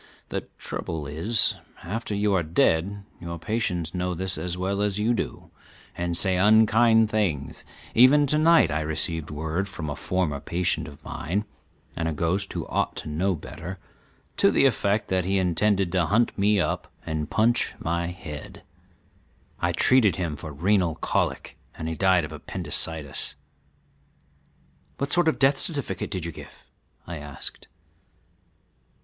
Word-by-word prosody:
The -, -, -4 dB
trouble 80 Hz, -3 st, -5 dB
is, 85 Hz, +11 st, +1 dB, 0.3 s
after 105 Hz, +4 st, -3 dB
you 105 Hz, 0 st, +1 dB
are 95 Hz, -, +3 dB
dead 85 Hz, +4 st, +1 dB, 0.2 s
your 85 Hz, 0 st, -6 dB
patients 90 Hz, -4 st, -1 dB
know 90 Hz, 0 st, -1 dB
this 95 Hz, +2 st, -3 dB
as 90 Hz, +2 st, -3 dB
well 95 Hz, +2 st, -1 dB
as 105 Hz, -1 st, 0 dB
you 110 Hz, +3 st, +2 dB
do -, -, -4 dB, 0.4 s
and 85 Hz, -1 st, 0 dB
say 95 Hz, 0 st, +3 dB
unkind 110 Hz, +2 st, +5 dB
things; 85 Hz, -11 st, -1 dB, 0.3 s
even 135 Hz, +5 st, +6 dB
to 150 Hz, +2 st, +1 dB
night 165 Hz, -, +5 dB
I 75 Hz, +1 st, 0 dB
received 80 Hz, +1 st, -2 dB
word 80 Hz, +6 st, -2 dB
from 80 Hz, -6 st, -5 dB
a -, -, -3 dB
former 90 Hz, -6 st, -1 dB
patient 85 Hz, +4 st, 0 dB
of 70 Hz, -, -13 dB
mine, 100 Hz, +7 st, -2 dB, 0.5 s
and 80 Hz, -, -1 dB
a 80 Hz, -, -1 dB
ghost 90 Hz, +6 st, -1 dB
who -, -, -3 dB
ought -, -, -1 dB
to -, -, -6 dB
know 90 Hz, +5 st, 0 dB
better, 90 Hz, +4 st, -8 dB, 0.6 s
to -, -, +5 dB
the -, -, +3 dB
effect 105 Hz, -4 st, +1 dB
that 95 Hz, -1 st, +1 dB
he 95 Hz, +2 st, +1 dB
intended 95 Hz, +1 st, +2 dB
to 90 Hz, -3 st, +2 dB
hunt 115 Hz, +3 st, +2 dB
me 105 Hz, +1 st, +3 dB
up -, -, -2 dB
and 80 Hz, -2 st, -3 dB
punch 115 Hz, +2 st, +2 dB
my 85 Hz, +1 st, -1 dB
head. 85 Hz, -4 st, -8 dB, 1.0 s
I 90 Hz, -, +1 dB
treated 105 Hz, +1 st, +4 dB
him 85 Hz, -4 st, -2 dB
for 75 Hz, +1 st, -8 dB
renal 90 Hz, +2 st, +1 dB
colic -, -, -2 dB, 0.2 s
and 80 Hz, -, -5 dB
he 80 Hz, -, -2 dB
died 90 Hz, 0 st, +3 dB
of -, -, -9 dB
appendicitis." 80 Hz, -4 st, -2 dB, 1.6 s
"What 140 Hz, +1 st, -2 dB
sort 175 Hz, -1 st, +3 dB
of 160 Hz, -, +3 dB
a -, -, -16 dB
death 135 Hz, 0 st, +4 dB
certificate 140 Hz, -, 0 dB
did 90 Hz, -4 st, -3 dB
you 85 Hz, -, -3 dB
give?" -, -, -13 dB, 0.4 s
I 85 Hz, -1 st, -6 dB
asked. 75 Hz, -1 st, -7 dB
90 Hz, 155 wpm, -25 LUFS, 80-105 Hz, 1.6 s, even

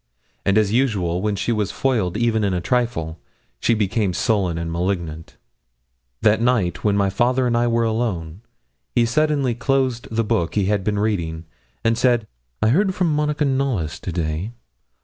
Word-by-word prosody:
And 100 Hz, +1 st, +2 dB
as 105 Hz, -2 st, +3 dB
usual, 100 Hz, -9 st, +1 dB
when 105 Hz, 0 st, 0 dB
she 105 Hz, +4 st, -1 dB
was 105 Hz, -4 st, 0 dB
foiled 110 Hz, -9 st, 0 dB
even 115 Hz, -2 st, +1 dB
in 95 Hz, -2 st, +1 dB
a -, -, 0 dB
trifle, 85 Hz, -8 st, -1 dB, 0.4 s
she 115 Hz, -, +2 dB
became 105 Hz, -2 st, 0 dB
sullen 95 Hz, -5 st, 0 dB
and 85 Hz, 0 st, -3 dB
malignant. 85 Hz, -2 st, -3 dB, 0.9 s
That 110 Hz, 0 st, +4 dB
night, 100 Hz, -9 st, +1 dB
when 105 Hz, -1 st, +2 dB
my 100 Hz, -1 st, +2 dB
father 125 Hz, +5 st, +2 dB
and 120 Hz, -1 st, +1 dB
I 120 Hz, 0 st, +2 dB
were 115 Hz, 0 st, +2 dB
alone, 105 Hz, -7 st, -2 dB, 0.5 s
he 120 Hz, -1 st, +4 dB
suddenly 140 Hz, 0 st, +1 dB
closed 130 Hz, 0 st, 0 dB
the 115 Hz, +1 st, 0 dB
book 85 Hz, -5 st, -1 dB
he 100 Hz, -3 st, +2 dB
had 100 Hz, -1 st, 0 dB
been 105 Hz, +1 st, 0 dB
reading, 85 Hz, -6 st, -1 dB, 0.4 s
and 115 Hz, 0 st, +2 dB
said 120 Hz, -4 st, +3 dB, 0.4 s
'I 110 Hz, -, +4 dB
heard 190 Hz, -, +2 dB
from 175 Hz, -4 st, +1 dB
Monica 150 Hz, 0 st, 0 dB
Knollys 130 Hz, -, -1 dB
to 90 Hz, -, -5 dB
day. 85 Hz, +5 st, -3 dB
110 Hz, 170 wpm, -21 LUFS, 90-120 Hz, 0.9 s, That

